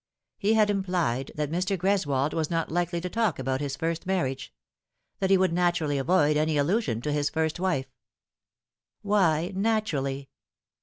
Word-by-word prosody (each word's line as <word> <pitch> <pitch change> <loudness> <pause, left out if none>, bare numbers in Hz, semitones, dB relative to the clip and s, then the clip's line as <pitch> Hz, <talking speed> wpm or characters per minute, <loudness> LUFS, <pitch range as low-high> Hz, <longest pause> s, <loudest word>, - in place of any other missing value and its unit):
He 215 +2 +2
had 210 -1 +4
implied 175 -10 -1
that 150 -1 -2
Mr. 185 +3 0
Greswold 155 -7 +1
was 160 -2 -1
not 165 -2 -1
likely 175 0 0
to 180 - -3
talk 220 -2 0
about 130 +1 -2
his 140 -1 -3
first 165 +3 -3
marriage 135 -8 -1 0.7
that 190 - 0
he 195 - +6
would 185 -2 +2
naturally 175 -5 +1
avoid 150 0 +3
any 155 0 +1
allusion 145 - 0
to 150 - -2
his 145 -1 0
first 160 +1 -1
wife. 175 -8 -1 1.1
Why 185 -4 +2
naturally? 155 -11 -1
165 Hz, 155 wpm, -27 LUFS, 145-190 Hz, 1.1 s, he